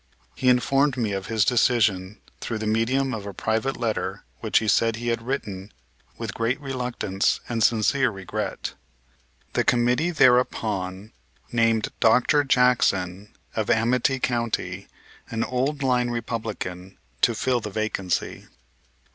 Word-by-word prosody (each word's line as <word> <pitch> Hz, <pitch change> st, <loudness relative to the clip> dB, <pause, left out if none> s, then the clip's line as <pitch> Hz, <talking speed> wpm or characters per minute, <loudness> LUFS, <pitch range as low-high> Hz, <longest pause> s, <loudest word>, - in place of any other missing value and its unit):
He 125 Hz, -, +1 dB
informed 135 Hz, +2 st, +3 dB
me 110 Hz, -4 st, 0 dB
of 95 Hz, -1 st, -3 dB
his 110 Hz, -3 st, +2 dB
decision 110 Hz, -5 st, +2 dB, 0.2 s
through 115 Hz, -, -3 dB
the 110 Hz, -, -4 dB
medium 125 Hz, +5 st, +1 dB
of 105 Hz, -3 st, -5 dB
a 100 Hz, -, -7 dB
private 110 Hz, +7 st, -1 dB
letter 115 Hz, -3 st, -2 dB, 0.2 s
which -, -, +1 dB
he 110 Hz, -, +1 dB
said 115 Hz, +2 st, +3 dB
he 120 Hz, +1 st, -3 dB
had 115 Hz, -1 st, -1 dB
written 105 Hz, -6 st, -4 dB, 0.5 s
with 115 Hz, -3 st, -5 dB
great 115 Hz, +4 st, -1 dB
reluctance 125 Hz, -8 st, -1 dB
and 115 Hz, -2 st, -1 dB
sincere 120 Hz, +4 st, +3 dB
regret. 95 Hz, -4 st, -4 dB, 0.8 s
The -, -, +2 dB
committee 125 Hz, +7 st, +2 dB
thereupon 110 Hz, -, +1 dB, 0.4 s
named 115 Hz, -2 st, +2 dB
Dr. 125 Hz, +6 st, +4 dB
Jackson, 105 Hz, -7 st, +1 dB, 0.2 s
of 110 Hz, -2 st, -1 dB
Amite 125 Hz, +3 st, +2 dB
County, 120 Hz, -2 st, -2 dB, 0.4 s
an 115 Hz, 0 st, -1 dB
old 135 Hz, +4 st, -1 dB
line 125 Hz, -2 st, +2 dB
Republican, 110 Hz, -6 st, -5 dB, 0.2 s
to 120 Hz, -, +3 dB
fill 125 Hz, +2 st, +1 dB
the 105 Hz, -, -6 dB
vacancy. 100 Hz, -3 st, -2 dB
115 Hz, 130 wpm, -24 LUFS, 105-125 Hz, 0.8 s, Dr